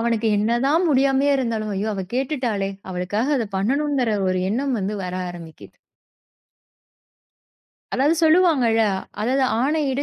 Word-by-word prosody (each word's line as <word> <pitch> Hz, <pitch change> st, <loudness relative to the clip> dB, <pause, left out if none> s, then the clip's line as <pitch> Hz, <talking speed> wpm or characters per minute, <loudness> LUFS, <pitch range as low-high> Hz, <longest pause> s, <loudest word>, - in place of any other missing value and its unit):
அவனுக்கு 230 Hz, -1 st, 0 dB
என்ன 230 Hz, +3 st, +1 dB
தான் 330 Hz, +5 st, +2 dB
முடியாமயே 275 Hz, +1 st, +3 dB
இருந்தாலும், 225 Hz, -4 st, -2 dB
ஐயோ, 205 Hz, +3 st, -2 dB
அவ 190 Hz, -1 st, -4 dB
கேட்டுட்டாளே! 250 Hz, -7 st, -1 dB, 0.2 s
அவளுக்காக 185 Hz, +8 st, -2 dB
அதை 225 Hz, -4 st, -2 dB
பண்ணணும்ங்குற 265 Hz, +3 st, 0 dB, 0.2 s
ஒரு 185 Hz, 0 st, 0 dB
எண்ணம் 260 Hz, +3 st, -1 dB
வந்து 200 Hz, +2 st, -3 dB
வர 180 Hz, 0 st, -5 dB, 0.2 s
ஆரம்பிக்கிது. 165 Hz, -2 st, -12 dB, 2.2 s
அதாவது 285 Hz, +5 st, +2 dB
சொல்லுவாங்கல, 310 Hz, -9 st, +4 dB, 0.4 s
அதாவது 260 Hz, +5 st, +1 dB, 0.2 s
ஆணையிடு, 285 Hz, -1 st, 0 dB
240 Hz, 120 wpm, -22 LUFS, 210-275 Hz, 2.2 s, சொல்லுவாங்கல